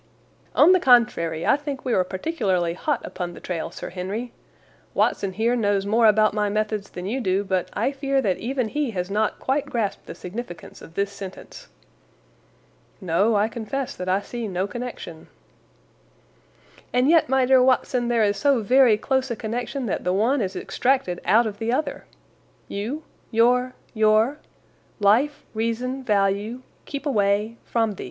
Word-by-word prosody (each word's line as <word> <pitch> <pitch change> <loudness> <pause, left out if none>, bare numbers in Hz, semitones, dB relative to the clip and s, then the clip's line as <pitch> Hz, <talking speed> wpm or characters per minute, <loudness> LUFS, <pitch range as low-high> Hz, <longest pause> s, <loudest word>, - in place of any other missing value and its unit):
"On 360 - +7
the 370 - +5
contrary, 210 - +3
I - - +5
think 285 -2 -6
we 250 - 0
are 185 - +3
particularly 185 - -1
hot 290 - -2
upon 175 -2 -5
the - - -10
trail, 170 -3 -4
Sir - - -8
Henry. 200 +7 -4 0.6
Watson 195 -1 +1
here 230 +4 +1
knows 205 -4 +1
more 225 +2 +4
about 215 0 +4
my 210 -1 0
methods 215 -1 -2
than 180 - -7
you 245 +7 -2
do, 195 -2 +1
but 190 -2 -1
I 270 - 0
fear 275 0 0
that 200 -8 0
even 250 -1 -2
he 295 0 -1
has 180 +2 -2
not 215 +1 0
quite 280 +2 -1
grasped 230 -7 -3
the - - -7
significance 180 -1 -8
of 165 - -13
this 200 0 0
sentence." 195 -2 -10 1.3
"No, 190 +6 +2
I 205 +1 +3
confess 240 +4 -4
that 185 0 -5
I 190 +2 +2
see 235 +1 -5
no 185 -1 -1
connection." 240 -8 -7 1.6
"And 250 +2 +2
yet, 325 -4 +4
my 265 -1 +3
dear 260 0 +5
Watson, 250 -1 +2
there 235 -2 +2
is 205 -1 +1
so 270 0 +2
very 250 -1 +5
close 265 +3 0
a 235 - -2
connection 240 +4 -4
that 210 - -2
the 180 - 0
one 235 +7 +2
is 190 -1 -3
extracted 245 -3 0
out 220 +6 +4
of 205 -2 -5
the 225 +1 -1
other. 280 +3 -2 0.6
'You,' 235 +10 -4 0.3
'your,' 250 +2 +2 0.2
'your,' 220 +5 +3 0.6
'life,' 245 +9 +3
'reason,' 230 +4 -2
'value,' 205 +3 0 0.2
'keep 280 +1 -6
away,' 210 -3 +1
'from 225 -2 0
the. 200 - -10
225 Hz, 165 wpm, -23 LUFS, 200-255 Hz, 1.6 s, On